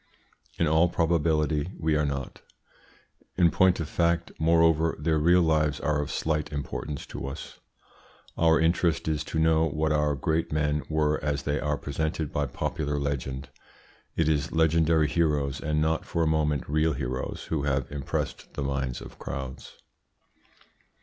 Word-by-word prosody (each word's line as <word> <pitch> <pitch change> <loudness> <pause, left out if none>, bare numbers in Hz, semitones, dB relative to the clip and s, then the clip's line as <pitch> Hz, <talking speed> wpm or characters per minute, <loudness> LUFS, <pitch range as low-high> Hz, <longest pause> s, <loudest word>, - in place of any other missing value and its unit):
In 85 - +2
all 80 +3 +4
probability 80 -2 +1
we 80 -2 +1
are 75 -1 +1
not. 70 -2 -5 1.0
In 85 -2 +5
point 95 -1 +3
of 80 - -2
fact, 85 +1 0
moreover, 80 0 +3
their 80 +1 +1
real 85 +3 +5
lives 75 -2 +2
are 75 0 0
of 75 - -4
slight 75 -2 -1
importance 75 0 -4
to - - -6
us. 70 - -8 0.8
Our 80 0 +4
interest 85 0 +1
is 75 -1 0
to - - -4
know 80 0 +3
what 80 +1 0
our 75 -1 +2
great 80 +3 -1
men 75 -1 +1
were 75 -1 +1
as 70 -2 -1
they 75 +1 -1
are 75 -1 -1
presented 80 +1 -3
by 75 -1 0
popular 75 0 -2
legend. 70 -1 -3 0.7
It 80 - +1
is 75 0 +1
legendary 80 -1 +3
heroes, 75 -3 0
and 75 0 0
not 80 +1 +1
for 85 - -1
a - - +1
moment 75 -3 +1
real 80 +2 +2
heroes, 65 +2 -4
who 80 -3 0
have 70 -2 -1
impressed 70 -2 -4
the 70 - -2
minds 65 -2 -2
of - - -11
crowds. 65 -1 -7
75 Hz, 155 wpm, -27 LUFS, 75-80 Hz, 1.0 s, In